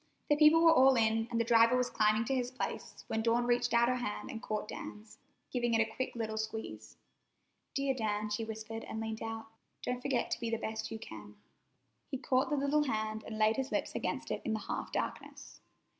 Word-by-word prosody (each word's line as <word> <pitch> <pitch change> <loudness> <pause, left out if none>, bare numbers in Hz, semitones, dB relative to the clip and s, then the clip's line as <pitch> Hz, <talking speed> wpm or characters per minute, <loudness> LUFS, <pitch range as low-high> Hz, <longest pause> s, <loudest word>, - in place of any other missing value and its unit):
The 295 - +5
people 310 +2 +6
were 330 -1 +8
all 265 -2 +6
in, 225 -1 +2
and 235 -1 -1
the - - +3
driver 230 +1 +5
was 250 0 0
climbing 215 +1 +3
to 270 - -1
his 250 -2 0
place, 255 - -5
when 220 - -1
Dawn 235 +1 +2
reached 240 0 +2
out 235 0 +4
her 250 0 +1
hand 225 +1 -4
and 225 -3 -6
caught 215 0 -3
Dan's, 210 +1 -9 0.3
giving 240 -2 +1
it - - +3
a 220 - -13
quick 260 - -3
little 220 -2 -3
squeeze. 220 0 -5 0.8
"Dear 275 -1 +1
Dan," 215 -3 -2
she 210 +2 -1
whispered 220 0 -6
as - - -7
she - - -3
leaned 220 0 -4
out, 225 0 -4 0.4
"don't 250 0 -2
forget 255 -2 0
to - - -1
be 235 -1 -2
the 230 - 0
best 220 0 -4
you 225 - -5
can." - - -10 0.7
He 270 - -2
caught 255 +1 +1
the 295 - +1
little 285 +2 +2
hand 215 -3 -2
and 220 - -5
laid 215 0 +3
his 265 +1 -2
lips - - -1
against - - -3
it - - -2
in 225 - -1
the 220 - -1
half - - -4
darkness. - - -5
230 Hz, 220 wpm, -33 LUFS, 220-255 Hz, 0.8 s, were